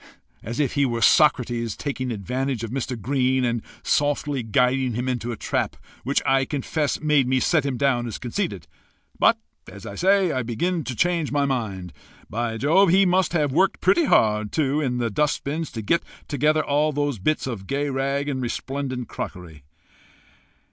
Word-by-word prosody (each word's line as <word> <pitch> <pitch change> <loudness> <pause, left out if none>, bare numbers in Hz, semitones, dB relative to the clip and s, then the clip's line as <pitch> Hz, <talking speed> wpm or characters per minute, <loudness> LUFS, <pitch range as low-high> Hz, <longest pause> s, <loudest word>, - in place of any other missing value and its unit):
as 115 +5 -5
if 140 -4 +1
he 140 - +2
were 120 -3 0
Socrates 120 -4 +3
taking 130 -3 -3
advantage 125 +3 -3
of 115 - -5
Mr. 125 -2 -3
Green 130 +2 +1
and 120 -1 -1 0.2
softly 145 -1 0
guiding 125 +2 +1
him 125 +2 -2
into 120 -2 -2
a - - -3
trap, - - -2 0.3
which 140 +2 0
I 135 -1 +3
confess 145 +2 -2
made 150 -4 +2
me 130 0 +2
set 150 0 +2
him 130 -3 -2
down 125 -3 +1
as 115 - -5
conceited; 125 - -3 0.5
but, - - +5 0.3
as - - -11
I - - -6
say, 190 -1 +3
I 130 - -1
begin 155 +9 -1
to 130 - -4
change 170 +1 0
my 145 -1 +1
mind. 105 -10 -3 0.4
By 115 +1 -2
Jove! 165 - +4
he 195 +3 +5
must 180 -2 +2
have 150 -5 +1
worked 185 +7 +2
pretty 345 -3 +3
hard 105 - +2
too 150 -1 +1
in 125 -4 -1
the 120 -2 -1
dust 150 +8 0
bins 155 +3 -3
to 110 -3 -5
get 170 +11 +2 0.3
together 150 +2 +1
all 150 +2 +2
those 145 -5 -1
bits 155 +11 0
of 110 -7 -5
gay 145 +1 -1
rag 140 +2 -1
and 135 -3 -2
resplendent 130 0 -4
crockery!" 80 -6 -8
135 Hz, 180 wpm, -23 LUFS, 120-150 Hz, 0.5 s, but